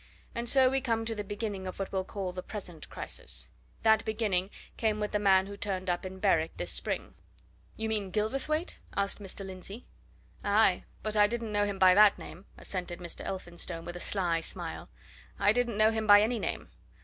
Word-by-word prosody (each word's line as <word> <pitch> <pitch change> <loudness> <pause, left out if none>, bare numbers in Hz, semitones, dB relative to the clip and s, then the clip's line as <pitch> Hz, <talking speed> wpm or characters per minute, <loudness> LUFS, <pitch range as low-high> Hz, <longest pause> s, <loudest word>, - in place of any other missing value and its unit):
And 235 0 -1
so 265 0 +6
we 270 +1 +1
come 230 -3 0
to 225 - -1
the 210 -1 -4
beginning 205 -2 -4
of 185 - -6
what 195 - -4
we'll 190 -1 0
call 190 -1 -4
the 180 0 -5
present 180 -6 -8
crisis. - - -6 0.3
That 220 0 +5
beginning 210 -4 0 0.3
came 215 -2 0
with 210 0 -2
the 210 - +1
man 190 -2 +5
who 200 +1 -7
turned 190 -2 -2
up 175 +2 -2
in 190 0 -9
Berwick 165 -5 +2
this 90 0 -2
spring." - - -1 0.6
"You 220 - -2
mean 210 -3 -1
Gilverthwaite?" 270 - -1 0.2
asked 200 +1 0
Mr. 195 0 -6
Lindsey. 190 +4 -8 0.6
"Aye 205 -2 +3 0.2
but 215 0 -2
I 210 -1 +6
didn't 230 0 -3
know 205 0 +2
him 200 -1 -3
by 185 -1 +7
that 205 +1 +7
name!" 185 +4 -10
assented 180 -2 -5
Mr. 170 -1 -6
Elphinstone, 175 -2 -5
with 175 - -6
a - - -5
sly 175 -4 +1
smile. - - -5 0.5
"I 205 - +4
didn't 240 -2 0
know 215 +1 +5
him 220 -1 -2
by 205 0 +9
any 230 +1 0
name. - - -3
205 Hz, 195 wpm, -30 LUFS, 185-220 Hz, 0.6 s, by